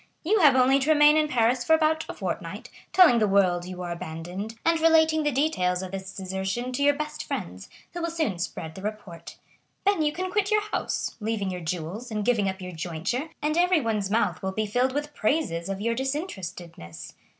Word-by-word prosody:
You 410 +7 +2
have 295 -7 +6
only 260 +1 +4
to 275 +3 -1
remain 300 -1 +6
in 310 -1 +3
Paris 240 -1 +2
for 320 - +3
about 315 0 +1
a - - -4
fortnight, - - -5 0.2
telling 340 -11 +6
the 215 - +3
world 185 -3 +2
you 180 0 -7
are 175 - -4
abandoned, 175 +6 -6
and 330 0 +3
relating 320 -1 +4
the 295 -1 +1
details 190 - 0
of 185 - -7
this 190 0 -6
desertion 190 +6 -3
to 255 - -3
your 285 0 +4
best 300 +1 -5
friends, 90 +2 -6 0.2
who 350 - -5
will 335 - -1
soon 315 - -2
spread 160 -2 -5
the 190 - -10
report. 200 -5 -7 0.5
Then 400 -4 +3
you 300 -1 +2
can 370 +4 -4
quit 405 0 +1
your 425 -1 +2
house, 425 - -3
leaving 210 -3 -2
your 180 -1 -5
jewels 180 +8 -4
and 210 -2 -3
giving 215 -5 +2
up 190 0 -6
your 180 0 -6
jointure, 180 - -3
and 305 +1 +1
everyone's 265 - +2
mouth 195 -5 0
will 190 - -2
be 215 +2 -1
filled 245 +5 0
with 295 +1 -3
praises 215 - -1
of 195 0 -3
your 230 +2 0
disinterestedness. 185 - -5
230 Hz, 205 wpm, -26 LUFS, 185-305 Hz, 0.5 s, have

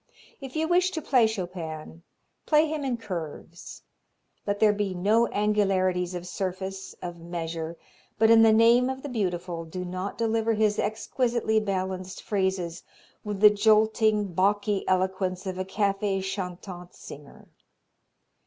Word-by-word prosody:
If 270 0 -8
you 320 0 0
wish 355 +2 +3
to - - +2
play 250 -5 +4
Chopin, 170 -6 -6 0.5
play 310 0 +4
him 305 -1 -3
in 255 -3 -1
curves; 170 -5 -7 0.6
let 205 0 -1
there 215 -1 +5
be 200 -2 -2
no 215 +6 +3
angularities 190 -4 +1
of 175 0 -5
surface, 190 +1 -5
of 175 -1 -6
measure, 165 -1 -5 0.4
but 220 +1 +5
in 225 0 +7
the 225 -1 +7
name 235 +3 +5
of 265 0 -5
the 290 - -5
Beautiful 180 -7 -2
do 180 +3 -6
not 185 +2 -5
deliver 225 0 +1
his 210 -1 +1
exquisitely 230 0 0
balanced 190 -2 -3
phrases 190 -4 -1 0.4
with 205 -2 -4
the 210 -1 +9
jolting, 215 -1 +3
balky 200 +2 +1
eloquence 185 0 0
of 185 -1 -4
a 185 - -2
cafe 195 0 0
chantant 185 -1 -6
singer. 145 0 -12
195 Hz, 140 wpm, -26 LUFS, 180-220 Hz, 0.6 s, the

